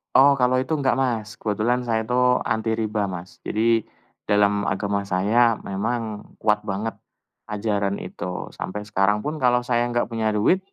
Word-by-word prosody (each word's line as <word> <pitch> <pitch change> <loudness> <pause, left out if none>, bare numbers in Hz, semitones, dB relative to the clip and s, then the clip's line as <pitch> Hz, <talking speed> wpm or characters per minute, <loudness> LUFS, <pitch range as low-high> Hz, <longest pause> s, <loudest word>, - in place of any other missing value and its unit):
Oh. 140 +2 +8
kalau 130 -1 +2
itu 145 +5 -1
enggak 135 -5 +1
Mas, 115 -5 0
kebetulan 110 +3 0
saya 110 -1 +1
itu 125 +3 -2 0.3
anti 110 -1 -1
riba 110 -1 -1
Mas, 90 -1 -8
jadi 115 +1 +3 0.5
dalam 105 0 +2
agama 100 +1 -1
saya 110 +5 +3
memang 110 +5 -2 0.4
kuat 105 -1 +3
banget 105 +3 -2 0.5
ajaran 100 -2 -1
itu. 90 0 -5
Sampai 105 +2 -4
sekarang 105 0 +1
pun 155 +1 -3
kalau 125 0 +4
saya 120 -1 +1
enggak 120 0 0
punya 110 -1 -1
duit, 140 - +3
110 Hz, 155 wpm, -23 LUFS, 100-120 Hz, 0.5 s, Oh